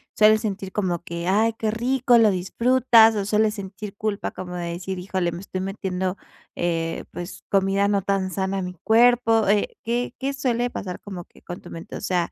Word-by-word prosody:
¿Sueles 215 Hz, 0 st, +5 dB
sentir 195 Hz, -3 st, -4 dB
como 180 Hz, -5 st, -1 dB
que 170 Hz, -1 st, -5 dB
ay, 220 Hz, +4 st, +3 dB
qué 220 Hz, -, 0 dB
rico, 245 Hz, +2 st, +2 dB
lo 220 Hz, -2 st, +5 dB
disfrutas 225 Hz, +4 st, +4 dB
o 205 Hz, -, 0 dB
sueles 215 Hz, +1 st, +2 dB
sentir 200 Hz, 0 st, -8 dB
culpa 210 Hz, 0 st, -2 dB
como 180 Hz, -1 st, -7 dB
de 170 Hz, -1 st, -3 dB
decir: 185 Hz, +2 st, -5 dB
"Híjole, 180 Hz, -1 st, -2 dB
me 170 Hz, +1 st, -7 dB
estoy 185 Hz, -1 st, -5 dB
metiendo, 190 Hz, -1 st, -3 dB, 0.4 s
eh, 165 Hz, -1 st, -2 dB
pues, 175 Hz, 0 st, -8 dB
comida 195 Hz, 0 st, +2 dB
no 200 Hz, -1 st, +1 dB
tan 195 Hz, -1 st, -1 dB
sana 190 Hz, +1 st, -2 dB
a -, -, -2 dB
mi 180 Hz, 0 st, -5 dB
cuerpo"? 225 Hz, -1 st, +4 dB
Eh, 205 Hz, +1 st, +1 dB
¿qué 240 Hz, +2 st, -2 dB
qué 275 Hz, +1 st, -2 dB
suele 245 Hz, -3 st, -1 dB
pasar 180 Hz, -2 st, -5 dB
como 190 Hz, -4 st, -7 dB
que -, -, -22 dB
con 175 Hz, -, -8 dB
tu -, -, -12 dB
mente? 165 Hz, -, -8 dB
O -, -, -9 dB
sea, 180 Hz, -2 st, 0 dB
200 Hz, 200 wpm, -23 LUFS, 185-225 Hz, 0.4 s, Sueles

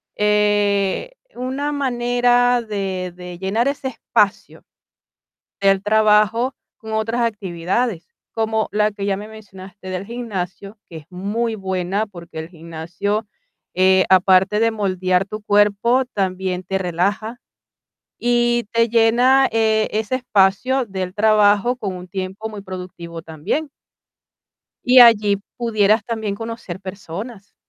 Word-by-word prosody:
eh, 205 Hz, -, +1 dB, 0.2 s
una 265 Hz, +4 st, -3 dB
manera 245 Hz, -2 st, +2 dB
de 195 Hz, -4 st, -4 dB
de 180 Hz, -1 st, -9 dB
llenar 205 Hz, +7 st, 0 dB
ese 275 Hz, -1 st, -2 dB
espacio 220 Hz, -3 st, -1 dB, 1.0 s
del 195 Hz, -1 st, +3 dB
trabajo 215 Hz, +4 st, +3 dB, 0.2 s
con 220 Hz, -1 st, -7 dB
otras 225 Hz, +2 st, -1 dB
actividades, 195 Hz, -1 st, -2 dB, 0.2 s
como 220 Hz, -1 st, -1 dB
la 210 Hz, 0 st, +2 dB
que 200 Hz, -1 st, -6 dB
ya 195 Hz, -, 0 dB
me 210 Hz, +2 st, -8 dB
mencionaste 190 Hz, -3 st, -12 dB
del 185 Hz, +1 st, -4 dB
gimnasio, 205 Hz, -3 st, -6 dB
que 165 Hz, -, -10 dB
es 150 Hz, -, -11 dB
muy 210 Hz, +5 st, -2 dB
buena, 190 Hz, +1 st, -2 dB
porque 170 Hz, -4 st, -11 dB
el 160 Hz, -, -7 dB
gimnasio, 170 Hz, +5 st, -4 dB, 0.5 s
eh, 185 Hz, 0 st, +4 dB
aparte 190 Hz, +2 st, +4 dB
de 230 Hz, 0 st, +3 dB
moldear 185 Hz, -3 st, 0 dB
tu 215 Hz, +1 st, -7 dB
cuerpo, 205 Hz, +5 st, +3 dB
también 185 Hz, -4 st, -2 dB
te 190 Hz, +1 st, -2 dB
relaja 195 Hz, +6 st, -2 dB, 0.8 s
y 240 Hz, 0 st, +1 dB
te 230 Hz, 0 st, +3 dB
llena, 240 Hz, +4 st, +4 dB
eh, 220 Hz, -1 st, +2 dB
ese 220 Hz, +4 st, -1 dB
espacio 245 Hz, +2 st, +2 dB
del 190 Hz, -3 st, -5 dB
trabajo 210 Hz, +2 st, +3 dB
con 200 Hz, -6 st, -4 dB
un 180 Hz, 0 st, -9 dB
tiempo 190 Hz, +3 st, -5 dB
muy 210 Hz, -2 st, -8 dB
productivo 180 Hz, -3 st, -8 dB
también. 165 Hz, -, -3 dB, 1.2 s
Y 250 Hz, +1 st, +6 dB
allí 215 Hz, -4 st, +7 dB, 0.2 s
pudieras 215 Hz, -2 st, +2 dB
también 220 Hz, -3 st, -3 dB
conocer 225 Hz, -4 st, -7 dB
personas 200 Hz, +3 st, -8 dB
205 Hz, 125 wpm, -20 LUFS, 190-230 Hz, 1.2 s, allí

